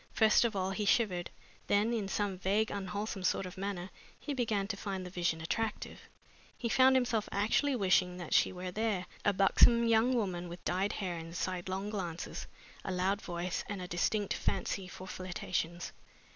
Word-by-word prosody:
First 220 +1 +5
of 225 - 0
all 190 0 0
he 210 +2 -2
shivered. 195 -5 +2 0.4
Then 210 +3 +3
in 215 -4 -1
some 200 0 -1
vague, 200 +4 +1
unwholesome 200 +1 -3
sort 185 - +1
of 180 - -8
manner 190 -1 -4 0.3
he 295 - -4
began 220 -6 0
to 205 - -1
find 195 -2 -4
the 180 - -7
vision 170 -3 0
attractive. 220 +6 -2 0.6
He 235 - -2
found 260 +2 +6
himself 240 -4 +1
actually 225 +7 +2
wishing 185 -4 +2
that 175 -3 -5
she - - +5
were 180 0 -5
there 210 -2 -1 0.2
a 205 - +4
buxom 230 +4 +5
young 230 +3 +4
woman 180 -6 -1
with 175 +1 -9
dyed 190 +3 0
hair 180 -4 -3
and 165 +1 -8
sidelong 185 +3 -2
glances, 175 -5 -4 0.4
a - - -3
loud 190 +3 0
voice, 175 0 -3
and 205 -2 -3
a 180 - -5
distinct 195 +4 0
fancy 195 -2 -1
for 185 0 -9
flirtations. 180 -2 -3
195 Hz, 175 wpm, -33 LUFS, 180-215 Hz, 0.6 s, found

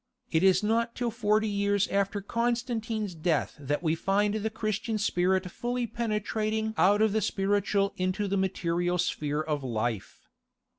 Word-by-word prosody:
It 160 - +3
is 190 +1 +4
not 230 +2 +1
till 240 -1 -1
forty 215 -1 +1
years 200 0 +1
after 200 +1 0
Constantine's 230 -2 -1
death 160 -1 0
that 145 +3 -2
we 160 -1 +2
find 200 +5 +1
the 220 0 -1
Christian 220 +1 -2
spirit 185 -2 +1
fully 245 +3 -2
penetrating 220 -1 -2
out 205 +3 +4
of 220 - +3
the 220 - +1
spiritual 200 0 +1
into 185 +3 -1
the 195 - 0
material 175 -2 0
sphere 150 -3 -1
of 150 -3 -2
life. 115 -5 -3
200 Hz, 150 wpm, -28 LUFS, 180-220 Hz, -, is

